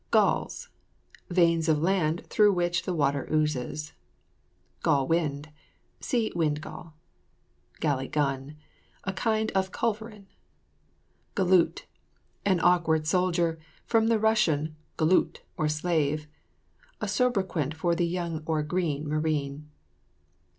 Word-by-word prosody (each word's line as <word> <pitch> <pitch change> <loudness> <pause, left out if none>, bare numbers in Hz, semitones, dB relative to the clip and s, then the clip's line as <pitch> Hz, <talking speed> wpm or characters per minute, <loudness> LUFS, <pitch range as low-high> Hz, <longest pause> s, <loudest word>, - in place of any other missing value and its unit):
GALLS. - - +1 0.6
Veins 170 -2 +3
of 155 - +4
land 170 -1 +1
through 210 -1 +4
which 175 0 0
the 185 - -1
water 140 -3 0
oozes. 150 -1 -1 0.9
GALL 135 -2 +2
WIND. 155 -3 0 0.5
See 235 -3 0
WIND 150 -3 +1
GALL. 160 +1 -10 0.9
GALLY 135 -4 0
GUN. 140 0 -2 0.5
A 190 - -3
kind 220 +2 0
of 190 -1 0
culverin. 220 -2 -3 1.1
GALOOT. 185 -3 +3 0.6
An 190 -3 +2
awkward 165 -3 +3
soldier, 170 -1 +1 0.3
from 225 -1 +3
the 230 -1 +3
Russian 160 -9 +2 0.2
golut, 165 +3 +2
or 155 -4 0
slave. 150 -1 0 0.7
A - - -2
soubriquet 190 - 0
for 170 +2 +1
the 170 0 +1
young 170 -2 -3
or 155 -2 +1
"green" 150 -2 -1
marine. 150 -1 -2
165 Hz, 110 wpm, -27 LUFS, 150-185 Hz, 1.1 s, of